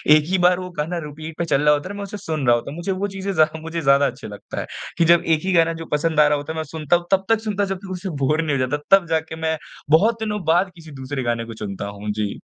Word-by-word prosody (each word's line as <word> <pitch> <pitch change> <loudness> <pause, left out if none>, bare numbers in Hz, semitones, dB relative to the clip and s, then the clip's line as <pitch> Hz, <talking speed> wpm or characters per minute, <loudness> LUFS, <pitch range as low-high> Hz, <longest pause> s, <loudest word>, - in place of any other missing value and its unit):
एक 155 - +3
ही 190 - +2
बार 180 0 +4
वो 180 0 -6
गाना 160 +4 -2
रिपीट 155 +2 -8
पे 170 - -1
चल 145 -3 +2
रहा 150 0 +5
होता 145 +4 -2
है - - -5
ना, - - -7
मैं 200 - -4
उसे 200 +1 -6
सुन 160 -8 -3
रहा 120 - +6
होता 120 +3 -4
हूँ। - - -8
मुझे 175 +3 -2
वो 190 +2 -1
चीज़ें 195 0 -4
ज़्या 155 -1 +2
मुझे 165 +1 -4
ज़्यादा 140 0 +4
अच्छे 125 - -7
लगता 105 -1 -7
है - - -3 0.3
कि 170 - +4
जब 170 +1 +5
एक 160 -2 +2
ही 190 - +1
गाना 165 -1 +4
जो 165 0 -7
पसंद 155 +1 +1
आ 150 - +7
रहा 150 0 +2
होता 145 +2 -5
है - - -7
मैं 160 - -1
सुनता 155 +1 0
हूँ 175 0 -1
तब 195 0 +3
तक 225 -1 +4
सुनता 205 -2 -1
जब 195 -1 -3
तक 190 - -7
उससे 185 +1 -4
बोर 155 +4 +2
नहीं 150 -3 0
हो 130 - +1
जाता। 145 +4 -1 0.2
तब 185 -3 -7
जाके 160 0 -1
मैं 160 0 0 0.3
बहुत 215 +9 +4
दिनों 210 -3 -3
बाद 175 +4 +3
किसी 160 -2 -13
दूसरे 130 0 -3
गाने 120 -1 -1
को 115 - -8
चुनता 100 -1 -4
हूँ। 100 +1 -5
जी। 105 -1 -3
160 Hz, 305 wpm, -22 LUFS, 145-185 Hz, 0.3 s, आ